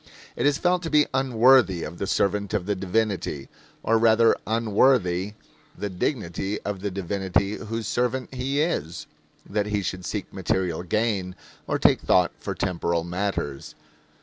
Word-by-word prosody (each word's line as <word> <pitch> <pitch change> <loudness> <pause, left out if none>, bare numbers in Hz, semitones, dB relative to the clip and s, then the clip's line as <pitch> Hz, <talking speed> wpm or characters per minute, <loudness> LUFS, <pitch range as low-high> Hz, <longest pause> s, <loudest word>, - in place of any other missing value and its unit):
It - - +1
is 145 -1 +2
felt 180 +1 +1
to 165 - -4
be 150 -1 +4
unworthy 125 -7 +4
of 85 +3 -7
the 100 - -2
servant 100 +1 0
of 95 -4 -1
the 105 - 0
divinity, 95 -7 -2 0.3
or 115 0 +3
rather 115 0 +5
unworthy 105 -4 +2 0.4
the 105 -1 -4
dignity 95 - -2
of 100 -2 -4
the 100 +2 -2
divinity 100 +1 -1
whose 115 0 -5
servant 125 +3 -1
he 135 +3 -1
is, 85 - -2 0.4
that 105 0 -1
he 105 -1 -1
should 90 +1 -4
seek - - -5
material 90 -3 -1
gain 95 -1 -1 0.3
or - - 0
take - - +3
thought 90 -1 +3
for - - -4
temporal 85 -3 -1
matters. 85 -5 -3
100 Hz, 150 wpm, -25 LUFS, 90-115 Hz, 0.4 s, rather